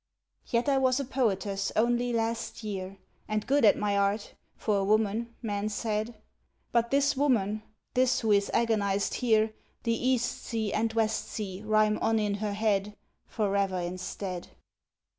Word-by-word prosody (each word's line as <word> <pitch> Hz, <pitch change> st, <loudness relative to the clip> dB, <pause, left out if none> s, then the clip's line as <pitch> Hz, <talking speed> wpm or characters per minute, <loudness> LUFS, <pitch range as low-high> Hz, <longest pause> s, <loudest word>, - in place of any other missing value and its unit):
Yet 235 Hz, +2 st, 0 dB
I 275 Hz, -1 st, +3 dB
was 260 Hz, 0 st, +3 dB
a 275 Hz, -, -2 dB
poetess 200 Hz, -6 st, 0 dB
only 240 Hz, +2 st, +2 dB
last 230 Hz, 0 st, -2 dB
year, 195 Hz, -2 st, -5 dB, 0.3 s
And 215 Hz, -1 st, -1 dB
good 285 Hz, +1 st, +2 dB
at 215 Hz, -, +6 dB
my 205 Hz, -1 st, 0 dB
art, 200 Hz, +1 st, 0 dB, 0.2 s
for 210 Hz, -2 st, 0 dB
a 195 Hz, -, +1 dB
woman, 215 Hz, +3 st, +1 dB
men 205 Hz, -1 st, -1 dB
said. 215 Hz, +1 st, -2 dB, 0.6 s
But 235 Hz, 0 st, +2 dB
this 280 Hz, +1 st, +3 dB
woman, 220 Hz, -7 st, +1 dB, 0.3 s
this, 255 Hz, 0 st, +3 dB
who 220 Hz, -2 st, +1 dB
is 200 Hz, -1 st, +3 dB
agonized 205 Hz, -4 st, +1 dB
here, 220 Hz, -3 st, +2 dB, 0.3 s
The 230 Hz, -, +1 dB
east 245 Hz, 0 st, 0 dB
sea 220 Hz, -3 st, -2 dB
and 225 Hz, +1 st, +1 dB
west 220 Hz, -1 st, +1 dB
sea 195 Hz, -3 st, -5 dB
rhyme 215 Hz, 0 st, +3 dB
on 225 Hz, -, +2 dB
in 210 Hz, -2 st, 0 dB
her 205 Hz, 0 st, -2 dB
head 205 Hz, -1 st, 0 dB, 0.3 s
Forever 200 Hz, -3 st, 0 dB
instead. 180 Hz, +1 st, -4 dB
215 Hz, 155 wpm, -29 LUFS, 200-235 Hz, 0.6 s, at